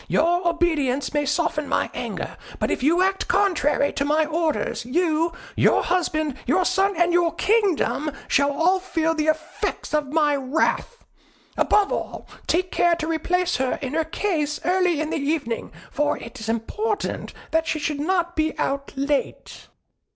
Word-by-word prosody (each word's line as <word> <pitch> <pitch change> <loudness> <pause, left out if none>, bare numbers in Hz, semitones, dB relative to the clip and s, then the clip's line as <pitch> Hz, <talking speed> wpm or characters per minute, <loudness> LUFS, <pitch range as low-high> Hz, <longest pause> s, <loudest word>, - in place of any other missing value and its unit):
Your 345 +3 +2
obedience 305 -6 0
may 295 -1 0
soften 300 -1 0
my - - 0
anger; - - -5 0.2
but - - -1
if - - -1
you 335 +7 +3
act 385 0 0
contrary 355 -7 +2
to 280 - -1
my 305 +2 +2
orders, 320 -3 -1
you, 325 +5 +1 0.2
your - - +3
husband, 310 -5 0
your 355 +7 +3
son, 385 +2 +2
and 345 0 +3
your 345 -1 +2
kingdom, 390 -8 +1 0.2
shall 280 0 +3
all 345 +6 +2
feel 325 -3 0
the 310 -1 -1
effect 310 - -2
of 295 -2 0
my 300 -2 +3
wrath. 285 - -1 0.5
Above 410 -1 +3
all, - - -4 0.2
take 360 +2 +1
care 345 -1 +3
to 315 - -4
replace 355 +3 0
her 260 -1 0
in 265 +1 -3
her 325 +1 +2
case 315 -3 -1
early 360 -3 +2
in 310 0 -2
the - - 0
evening, 280 -5 -2 0.2
for 295 +1 0
it 230 - -10
is 220 0 -5
important 410 - -2 0.2
that 325 0 +1
she - - 0
should 300 -1 -2
not 345 +2 0
be 315 0 0
out 275 0 -2
late." 280 +1 -2
320 Hz, 165 wpm, -23 LUFS, 290-350 Hz, 0.5 s, you